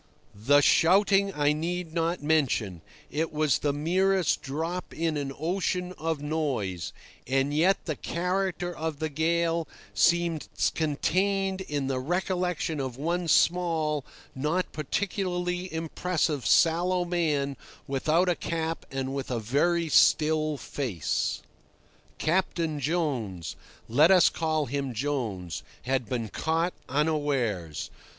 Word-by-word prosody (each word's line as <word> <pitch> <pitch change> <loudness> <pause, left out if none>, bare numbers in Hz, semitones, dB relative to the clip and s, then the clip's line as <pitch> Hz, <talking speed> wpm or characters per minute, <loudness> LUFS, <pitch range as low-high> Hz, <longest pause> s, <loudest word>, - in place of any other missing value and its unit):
The 135 +8 +4
shouting 195 +6 +4
I 145 0 +3
need 165 +1 -3
not 165 -1 -1
mention—it 145 - -1
was 155 -2 +2
the 145 - +1
merest 180 +4 +1
drop 165 +6 -4
in 165 -1 0
an 140 -2 -2
ocean 180 +2 -1
of 160 -2 -2
noise—and 135 - -2
yet 175 +6 +2
the 155 - -2
character 180 0 -2
of 160 -1 -3
the 155 +1 -2
gale 165 +1 0 0.3
seems 170 +8 +2 0.3
contained 190 +5 0
in 145 -6 -2
the 130 -1 -1
recollection 175 +1 -1
of 130 -3 -4
one 170 +4 -1
small, 160 -3 +2 0.3
not 155 +7 -1
particularly 180 +2 -2
impressive, 160 -2 -1
sallow 175 +2 +3
man 150 -6 0 0.3
without 155 +6 +2
a 180 - +4
cap 165 -1 -3
and 135 0 -3
with 135 -1 -4
a 125 - -1
very 165 +9 +1
still 155 0 +4
face. 120 - -2 0.7
Captain 165 -2 0
Jones—let 140 - 0
us 185 -2 +7
call 155 -2 0
him 135 -1 -3
Jones—had 125 - -3
been 120 -4 -2
caught 165 - 0 0.2
unawares. 135 - -1
155 Hz, 110 wpm, -27 LUFS, 140-175 Hz, 0.7 s, us